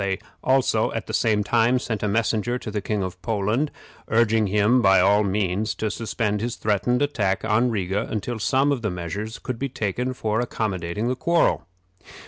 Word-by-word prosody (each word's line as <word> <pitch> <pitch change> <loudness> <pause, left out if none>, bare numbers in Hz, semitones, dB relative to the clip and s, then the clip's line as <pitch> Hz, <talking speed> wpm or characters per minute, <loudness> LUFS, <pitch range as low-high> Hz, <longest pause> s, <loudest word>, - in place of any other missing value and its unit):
They 95 -1 0 0.3
also, 130 0 +2
at - - -3
the - - -7
same 105 -2 +2
time, 115 +3 +3
sent 115 -4 -3
a 105 - 0
messenger 110 +3 0
to 110 - -7
the 105 -1 -2
King 105 0 -1
of 90 0 -6
Poland, 110 +8 0 0.4
urging 110 -1 +3
him 105 +5 +3
by 95 -2 +5
all 100 +3 +4
means 100 +1 -1
to 110 -1 -2
suspend 105 -2 -2
his 120 +1 -2
threatened 115 +5 +1
attack 100 -10 0
on 110 +3 +2
Riga 100 -1 -1
until 110 +2 -3
some 135 +6 +2 0.2
measures 100 +6 -5
could 125 -3 -5
be 140 - -2
taken 125 +1 -2
for 110 -2 -1
accommodating 105 -3 -2
the 125 - 0
quarrel. 170 - +1
110 Hz, 175 wpm, -24 LUFS, 100-120 Hz, 0.4 s, by